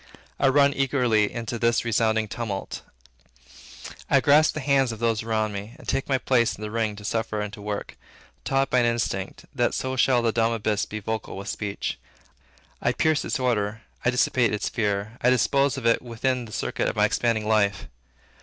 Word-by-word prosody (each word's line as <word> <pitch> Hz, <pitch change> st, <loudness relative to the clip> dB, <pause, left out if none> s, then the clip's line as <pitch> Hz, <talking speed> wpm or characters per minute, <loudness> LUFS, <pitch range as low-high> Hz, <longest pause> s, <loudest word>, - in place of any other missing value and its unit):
I 135 Hz, -, +4 dB
run 140 Hz, +1 st, +4 dB
eagerly 125 Hz, -6 st, +2 dB
into 115 Hz, 0 st, -4 dB
this 115 Hz, 0 st, +2 dB
resounding 110 Hz, -1 st, +1 dB
tumult. 105 Hz, -3 st, -5 dB, 1.3 s
I -, -, +5 dB
grasp 150 Hz, +2 st, +4 dB
the -, -, -2 dB
hands 135 Hz, -3 st, +2 dB
of 115 Hz, -, -6 dB
those 115 Hz, -1 st, 0 dB
next 110 Hz, -1 st, 0 dB
me, 100 Hz, +4 st, -7 dB
and 155 Hz, -, -15 dB
take 135 Hz, -, -1 dB
my 135 Hz, -, +3 dB
place 125 Hz, -3 st, +2 dB
in 105 Hz, -, -10 dB
the 105 Hz, -, -5 dB
ring 110 Hz, -2 st, -1 dB
to 105 Hz, 0 st, -10 dB
suffer 110 Hz, -1 st, -2 dB
and 105 Hz, 0 st, -4 dB
to 105 Hz, -, -9 dB
work, 105 Hz, 0 st, -5 dB, 0.5 s
taught 135 Hz, 0 st, 0 dB
by 125 Hz, -, +4 dB
an 120 Hz, -, +3 dB
instinct, 115 Hz, -5 st, -2 dB
that -, -, +1 dB
so 130 Hz, 0 st, -2 dB
shall 125 Hz, -1 st, +3 dB
the 115 Hz, -, +2 dB
dumb 115 Hz, 0 st, +1 dB
abyss 105 Hz, -2 st, 0 dB
be 110 Hz, -, -6 dB
vocal 110 Hz, -1 st, -4 dB
with 100 Hz, -, -6 dB
speech. 100 Hz, -2 st, -4 dB, 0.8 s
I -, -, +1 dB
pierce 155 Hz, -1 st, +1 dB
its 150 Hz, -, -2 dB
order; 115 Hz, -3 st, -1 dB, 0.2 s
I -, -, +3 dB
dissipate 125 Hz, -2 st, +2 dB
its 105 Hz, -, -2 dB
fear; 105 Hz, +1 st, -2 dB
I 125 Hz, -, +4 dB
dispose 135 Hz, +3 st, +2 dB
of 130 Hz, -, -6 dB
it 115 Hz, -, +3 dB
within 125 Hz, +1 st, -2 dB
the 110 Hz, -, -12 dB
circuit -, -, -2 dB
of -, -, -5 dB
my -, -, +4 dB
expanding 115 Hz, -3 st, 0 dB
life. 105 Hz, -2 st, +1 dB
115 Hz, 195 wpm, -25 LUFS, 105-125 Hz, 1.3 s, I